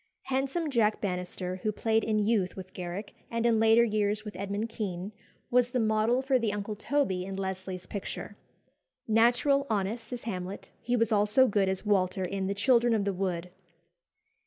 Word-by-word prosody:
Handsome 270 +4 -1
Jack 220 -4 +2
Bannister, 180 -1 -3
who 215 +3 -1
played 220 +1 +1
in 220 -1 +1
youth 205 -3 +1
with 185 -1 -9
Garrick, 180 +3 -6 0.2
and 230 0 -1
in 230 -2 +4
later 225 +1 +6
years 210 -1 0
with 210 - -7
Edmund 200 +3 -3
Kean, 195 -3 -4 0.4
was 245 0 +4
the 250 - -1
model 220 +3 +2
for 265 -1 +2
the 225 -3 0
Uncle 205 +1 -4
Toby 215 -5 0
in 190 +1 -5
Leslie's 190 -1 -4
picture. 200 - -6 0.7
Natural, 240 +5 +4
honest, 215 +3 -2
as 245 -1 -5
Hamlet, 190 -3 -5
he 245 +1 0
was 230 -2 +1
also 210 +5 +4
good 200 -3 +2
as 190 +2 -3
Walter 190 -2 +1
in 190 +1 -2
"The 200 - -1
Children 235 +2 +3
of 205 -2 0
the 200 - 0
Wood." 180 -2 -3
210 Hz, 175 wpm, -29 LUFS, 190-230 Hz, 0.7 s, later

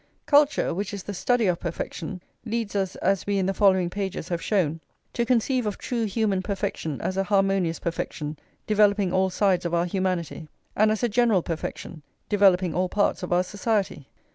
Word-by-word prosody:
Culture, 290 0 +3
which 200 +3 -3
is 195 - -7
the 205 - -5
study 240 +4 +1
of 180 -2 +1
perfection, 170 +1 -5 0.2
leads 225 -2 -3
us, 190 -2 -1
as 195 +1 0
we 200 -1 +1
in 190 - +1
the 195 - 0
following 190 -3 +3
pages 190 -2 -4
have 170 -2 -2
shown, 165 -7 0 0.3
to 235 -1 -1
conceive 250 -1 +1
of 205 - -3
true 235 -2 -2
human 205 -2 0
perfection 185 -6 -3
as 190 - -2
a 195 - +2
harmonious 195 -4 +1
perfection, 155 -3 -4 0.3
developing 205 -3 +3
all 190 0 +2
sides 190 -1 +1
of 170 0 -1
our 170 +1 +2
humanity; 180 -3 -2 0.3
and 215 +1 +4
as 215 +2 -1
a - - +4
general 225 -5 +2
perfection, 165 0 -5 0.3
developing 190 -4 +4
all 180 +1 0
parts 205 +1 +1
of 180 - -5
our 175 +1 +3
society. 200 - -2
195 Hz, 185 wpm, -25 LUFS, 180-210 Hz, 0.3 s, and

